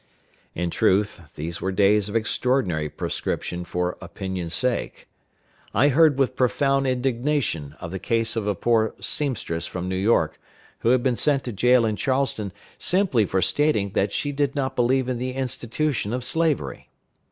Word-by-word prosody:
In 85 0 -2
truth, 100 0 +1
these 80 +3 -5
were 95 - -1
days 100 +1 +3
of 105 - -6
extraordinary 110 - +1
proscription 90 +4 -3
for 90 +1 -2
opinion's 90 -2 -4
sake. 125 +4 -1 0.7
I 145 - +5
heard 150 0 +5
with 130 -2 +1
profound 135 +2 +2
indignation 125 - -1
of 85 -2 -7
the 95 - -4
case 115 +1 0
of 110 -3 -2
a 105 - +1
poor 110 +2 +1
seamstress 100 - -2
from 90 0 -5
New 95 - -2
York, 100 +5 +2 0.4
who 115 - +1
had 125 0 +3
been 125 -3 +1
sent 145 -3 +2
to 120 - -4
jail 125 +3 +4
in 110 -2 -1
Charleston 130 -7 0 0.3
simply 175 - +2
for 95 0 +1
stating 145 -10 +2
that 100 - 0
she 145 - -1
did 145 0 0
not 135 -2 -1
believe 125 +1 +2
in 125 -2 -2
the 130 +1 -3
institution 125 -2 -2
of 125 0 -2
slavery. 160 +2 -1
120 Hz, 165 wpm, -24 LUFS, 95-135 Hz, 0.7 s, I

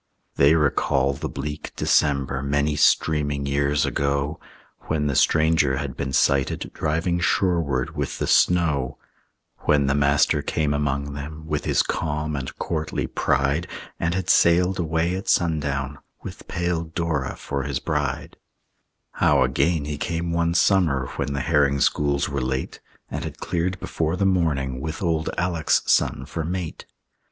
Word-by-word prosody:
They 70 +3 +5
recall 70 -2 +1
the 70 - -5
bleak 75 +2 -6
December 70 -2 +1
Many 70 +2 0
streaming 75 -1 +2
years 70 +1 +1
ago, 70 +2 -1 0.5
When 75 -1 0
the 70 - 0
stranger 80 -4 +3
had 70 -2 -4
been 70 -1 -3
sighted 70 0 +1
Driving 80 +3 -1
shoreward 85 -4 0
with - - -3
the - - -1
snow; 80 -7 +2 0.7
When 75 -2 +3
the 70 - +2
Master 70 0 +3
came 75 -2 -1
among 70 -1 -1
them 75 +2 -7
With - - -2
his - - +2
calm 75 0 -2
and 65 -1 -5
courtly 80 -2 -2
pride, 70 +5 0 0.3
And 85 +1 0
had 95 -1 -2
sailed 90 +2 +4
away 85 +1 0
at 95 - -6
sundown 75 -4 0 0.2
With - - -9
pale 85 -1 -1
Dora 80 -5 -2
for 70 -1 -4
his 70 -1 -2
bride; - - -3 0.7
How - - +3
again 75 +1 +1
he 75 -1 -4
came 85 0 -2
one 85 0 0
summer 80 -10 +2
When 70 - -2
the 70 - -2
herring 70 -2 +2
schools 70 +1 +1
were 70 -1 -3
late, 65 +1 -3 0.3
And - - -3
had - - -6
cleared 90 +2 -2
before 80 +1 -2
the 100 - 0
morning 75 -9 0
With 80 +4 -5
old 80 -2 0
Alec's 90 -3 +1
son - - +2
for 80 - -4
mate. 85 0 -5
75 Hz, 150 wpm, -23 LUFS, 70-85 Hz, 0.7 s, They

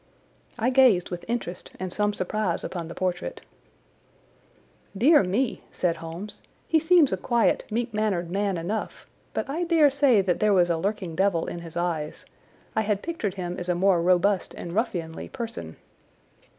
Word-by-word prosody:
I 240 +2 +1
gazed 250 -10 +4
with 175 -1 -5
interest 220 -6 -4
and 185 -1 -3
some 210 0 +1
surprise 205 -1 -2
upon 170 -3 -4
the 170 - -8
portrait. 180 - -3 1.6
"Dear 290 +7 +6
me!" 215 +8 -1
said 170 -2 0
Holmes, 165 +6 -8 0.3
"he 320 - +4
seems 320 - +4
a - - 0
quiet, 235 +4 +1
meek 235 +1 -2
mannered 195 -5 -1
man 200 -1 0
enough, 195 +7 -4 0.3
but - - -1
I 310 +6 -2
dare 325 -4 +4
say 270 -6 +4
that 180 -2 0
there 210 -1 +3
was 175 -2 +4
a 165 - +1
lurking 190 -3 -2
devil 190 -2 +2
in 175 - -5
his 170 -1 -8
eyes. 165 -3 -2 0.5
I 220 - +3
had 205 -2 -1
pictured 225 - -3
him 180 -2 -4
as 180 0 -3
a 175 - +2
more 185 -1 +3
robust 185 +2 +2
and 170 - -7
ruffianly 175 -7 -2
person." 225 - -6
195 Hz, 165 wpm, -26 LUFS, 175-230 Hz, 1.6 s, Dear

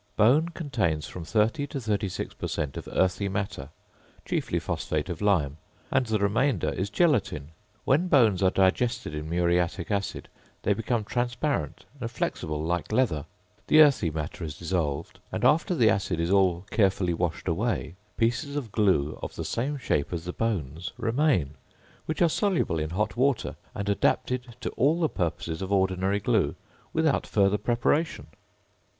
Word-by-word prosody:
Bone 135 +10 +4
contains 110 - -1
from 85 +3 -7
30 110 - +1
to 140 - -4
36 105 -5 -2
per - - -5
cent. 70 -3 -3
of - - -7
earthy 95 +2 +1
matter 95 -9 -3 0.6
chiefly - - -1
phosphate 75 +3 -2
of 85 0 -5
lime, 80 -9 +2 0.3
and 130 -2 +2
the 110 -1 +1
remainder 105 - +1
is 95 +2 -2
gelatine. 105 - +1 0.4
When 150 +7 +3
bones 115 - +4
are 95 - +5
digested 95 -1 +1
in 75 +1 -5
muriatic 85 +1 0
acid 100 -1 -2 0.4
they 105 - +3
become 115 +1 -1
transparent 120 - -2
and 120 -2 -3
flexible 75 -8 -3
like 85 +4 -2
leather, 105 - +1 0.4
the 155 - +7
earthy 140 - +5
matter 80 +2 -5
is 75 -3 -5
dissolved, 85 -5 -2
and - - -1
after 165 +4 +3
the 115 -8 +5
acid 95 -3 -1
is 85 +2 0
all 95 -2 +3
carefully 95 -4 +2
washed 85 -1 -2
away, 80 - -1 0.2
pieces 125 +5 0
of 130 -8 -3
glue 95 -10 +2
of - - -6
the - - -4
same 140 +5 -2
shape 75 - -1
as 85 -2 -4
the 90 - -4
bones 90 - -2
remain, 115 - +1 0.5
which 155 +2 +1
are - - +6
soluble 165 - +1
in 75 0 -2
hot 100 +6 -1
water 130 +1 +1 0.2
and 100 - -3
adapted 120 +4 0
to - - -3
all 150 +6 +2
the 165 - +3
purposes 85 0 -3
of 95 +1 -4
ordinary 95 0 +1
glue, - - +1 0.4
without 160 -3 +1
further 100 0 +2
preparation. 145 +9 0
100 Hz, 160 wpm, -27 LUFS, 85-125 Hz, 0.6 s, the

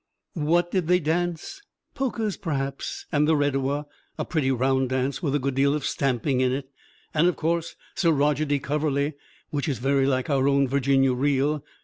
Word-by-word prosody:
What 170 +2 +1
did 185 -5 0
they 180 +1 +4
dance? 175 - -2 0.3
Polkas, 230 -7 -2
perhaps, 140 -5 -4
and 150 0 +2
the 160 - +4
redowa, 145 0 0 0.3
a - - -2
pretty 155 -6 0
round 130 0 +1
dance 130 +3 -1
with 145 -5 0
a - - +4
good 140 -1 -2
deal 140 +2 +2
of 150 - -3
stamping 130 0 0
in 130 -1 +2
it; 135 +1 -3 0.5
and 160 +3 +3
of 180 - +1
course 165 +1 -1 0.2
Sir 170 -3 +2
Roger 150 0 +2
de 145 -1 +1
Coverley, 145 +1 -1 0.4
which 145 +1 -1
is 135 - -1
very 135 +3 +2
like 130 -2 0
our 140 -3 +1 0.3
Virginia 135 0 +2
Reel. 140 +2 +1
145 Hz, 175 wpm, -25 LUFS, 135-160 Hz, 0.5 s, they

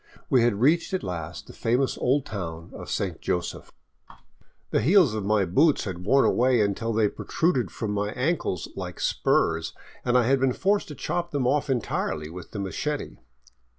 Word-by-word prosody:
We 130 - +5
had 120 -2 +3
reached 165 - +3
at 185 - -3
last 85 -4 -5
the - - -12
famous 125 +4 0
old 135 +2 +1
town 85 -5 -6
of - - -8
Saint - - -2
Joseph. 90 -1 -3 1.0
The - - +2
heels 170 - +5
of 110 -2 -2
my 105 -1 +2
boots 140 - +3
had 90 -2 -6
worn 135 +4 +5
away 125 0 +3
until 105 +3 0
they 110 -1 +3
protruded 160 - 0
from 110 -2 -4
my 105 0 -1
ankles 130 - -1
like - - -6
spurs, 80 0 +1 0.3
and 125 0 +3
I 125 - +4
had 135 +2 +3
been 130 -1 +2
forced 200 +6 +1
to 150 - -8
chop 175 +6 -2
them 140 -5 -1
off 145 +3 +1
entirely 80 - -2
with 90 0 -9
the - - -8
machete. 140 +10 -3
120 Hz, 180 wpm, -26 LUFS, 100-140 Hz, 1.0 s, We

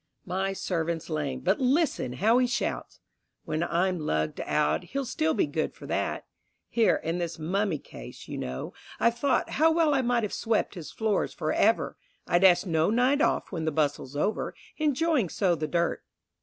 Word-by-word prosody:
My 190 +2 -1
servant's 170 -3 -2
lamed, 145 -4 -2
but 190 +3 +2
listen 265 - +1
how 220 - +3
he 250 - +3
shouts! 240 - -3 0.5
When 155 - -2
I'm 175 +1 +1
lugged 80 - -1
out, 75 +2 +1
he'll 275 0 -3
still 160 -9 0
be - - +2
good 155 +2 -2
for - - -11
that. - - -2 0.4
Here 230 -2 +3
in 165 +2 -2
this 170 -1 -3
mummy 185 +2 0
case, - - -11
you - - -5
know, 65 +1 -5 0.3
I've 235 0 +2
thought 270 -2 +1
How 320 +1 +6
well 320 -2 +3
I 270 - +3
might 240 -2 +1
have 210 - -3
swept 225 -1 0
his 170 -6 -8
floors 220 -2 -1
for - - -1
ever, - - +2 0.3
I'd 175 +2 +2
ask 180 -1 +6
no 160 -1 +2
night 250 +6 +3
off - - +1
when 165 -4 -3
the 160 - +1
bustle's 145 -2 -1
over, 200 +9 -1 0.2
Enjoying 305 - +1
so 185 0 +1
the 155 -2 -2
dirt. 170 +2 0
185 Hz, 185 wpm, -27 LUFS, 160-240 Hz, 0.5 s, How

